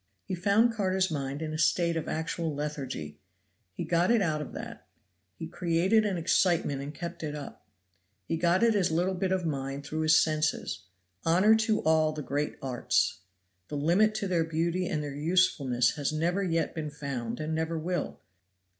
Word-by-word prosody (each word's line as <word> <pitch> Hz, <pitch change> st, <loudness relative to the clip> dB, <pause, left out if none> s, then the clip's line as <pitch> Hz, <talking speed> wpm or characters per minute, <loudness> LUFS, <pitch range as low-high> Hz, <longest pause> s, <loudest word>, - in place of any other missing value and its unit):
He 195 Hz, -, -5 dB
found 205 Hz, +6 st, +3 dB
Carter's 190 Hz, -3 st, 0 dB
mind 140 Hz, 0 st, -3 dB
in 155 Hz, -1 st, -4 dB
a 155 Hz, -, -3 dB
state 170 Hz, 0 st, +2 dB
of 165 Hz, -, -3 dB
actual 160 Hz, -1 st, -2 dB
lethargy. 135 Hz, -, -5 dB, 0.5 s
He 95 Hz, -, -5 dB
got 175 Hz, +1 st, +2 dB
it 235 Hz, -1 st, +4 dB
out 155 Hz, -6 st, 0 dB
of 150 Hz, -, -7 dB
that; -, -, -8 dB, 0.5 s
he -, -, -6 dB
created 185 Hz, +5 st, +2 dB
an 195 Hz, -3 st, -1 dB
excitement 165 Hz, -4 st, +2 dB
and 140 Hz, +1 st, -5 dB
kept 170 Hz, +3 st, -7 dB
it 150 Hz, -2 st, -4 dB
up. 145 Hz, -2 st, -9 dB, 0.6 s
He 165 Hz, -, -1 dB
got 175 Hz, +5 st, +2 dB
at 230 Hz, -1 st, +5 dB
his 195 Hz, -4 st, +2 dB
little 175 Hz, +4 st, +1 dB
bit 185 Hz, 0 st, -1 dB
of 185 Hz, -2 st, 0 dB
mind 135 Hz, -2 st, -3 dB
through 155 Hz, +2 st, -3 dB
his 155 Hz, 0 st, +5 dB
senses. 155 Hz, -, 0 dB, 0.4 s
Honor 185 Hz, +7 st, +5 dB
to 220 Hz, -1 st, +1 dB
all 155 Hz, -1 st, +3 dB
the 150 Hz, -1 st, -5 dB
great 145 Hz, +2 st, -2 dB
arts! 130 Hz, -2 st, 0 dB, 0.5 s
The 145 Hz, -, -4 dB
limit 185 Hz, +9 st, +3 dB
to 210 Hz, -2 st, -2 dB
their 175 Hz, -3 st, +1 dB
beauty 170 Hz, +3 st, -1 dB
and 150 Hz, -2 st, -2 dB
their 145 Hz, -1 st, -5 dB
usefulness 145 Hz, -6 st, +2 dB
has 145 Hz, -1 st, -1 dB
never 170 Hz, +5 st, 0 dB
yet 165 Hz, -4 st, 0 dB
been 155 Hz, -2 st, -4 dB
found 135 Hz, -5 st, -5 dB
and 155 Hz, +1 st, -3 dB
never 160 Hz, +1 st, -1 dB
will. 175 Hz, +3 st, -3 dB
160 Hz, 180 wpm, -29 LUFS, 150-180 Hz, 0.6 s, at